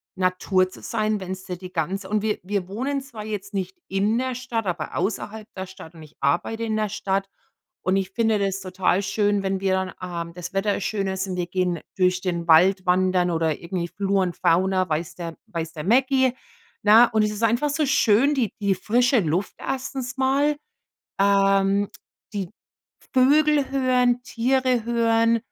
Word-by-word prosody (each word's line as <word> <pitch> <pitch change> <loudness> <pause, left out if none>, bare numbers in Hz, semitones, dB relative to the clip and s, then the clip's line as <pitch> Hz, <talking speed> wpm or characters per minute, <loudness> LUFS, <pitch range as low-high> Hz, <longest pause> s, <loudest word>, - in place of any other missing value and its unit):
Natur 185 0 +1
zu - - -14
sein, 215 -2 -1
wenn's 185 0 -6
dir 180 -1 -5
die 185 0 -10
ganz 190 +4 -2
und 210 +1 0
wir 215 -1 0
wir 195 -1 -2
wohnen 270 +7 -2
zwar 235 -6 -9
jetzt 205 -2 -5
nicht 190 -1 -3
in 200 +4 +1
der 255 0 -1
Stadt, 240 -3 -3
aber 170 -4 -3
außerhalb 210 +3 -3
der 190 - -3
Stadt 185 -3 -12
und 160 -2 -12
ich 155 - -16
arbeite 220 +11 0
in 220 -1 -1
der 215 -1 0
Stadt. 195 -1 -1 0.5
Und 190 +1 +1
ich 190 0 -2
finde 220 0 +1
das 195 -1 -1
total 185 +1 0
schön, 205 0 +1
wenn 190 0 -1
wir 190 -1 +1
dann 190 0 -1 0.3
ähm, 170 - -13
das 180 +1 -7
Wetter 200 +1 +1
is 195 - -4
schön 200 -3 -1
ist. 190 0 -2
Wir 180 - -1
gehen 180 -1 -1 0.2
durch 185 -1 +3
den 170 -2 -2
Wald 185 +4 +5
wandern 180 0 +2
oder 160 -2 0
irgendwie 170 0 -3
Flor 195 +1 0
und 180 -2 -3
Fauna, 185 +1 +2
weiß 155 +1 -2
der 170 -2 -7
weiß 165 -1 -5
der 150 -2 -6
Mecki. 260 +4 +3 0.5
Na, 225 +3 +9
und 220 -1 +1
es 210 - 0
ist 210 +2 -5
einfach 235 +6 +2
so 295 +2 0
schön, 265 +1 +3
die 235 -7 0
die 200 -1 +2
frische 245 +6 +2
Luft 175 +1 -1
erstens 265 -1 -4
mal, 275 +3 +2 0.6
ähm, 195 0 +3 0.5
die 195 -4 -3 0.6
Vögel 290 +2 +4
hören, 250 -2 +2
Tiere 255 0 +1
hören, 230 -1 +3
200 Hz, 180 wpm, -24 LUFS, 185-230 Hz, 0.6 s, Na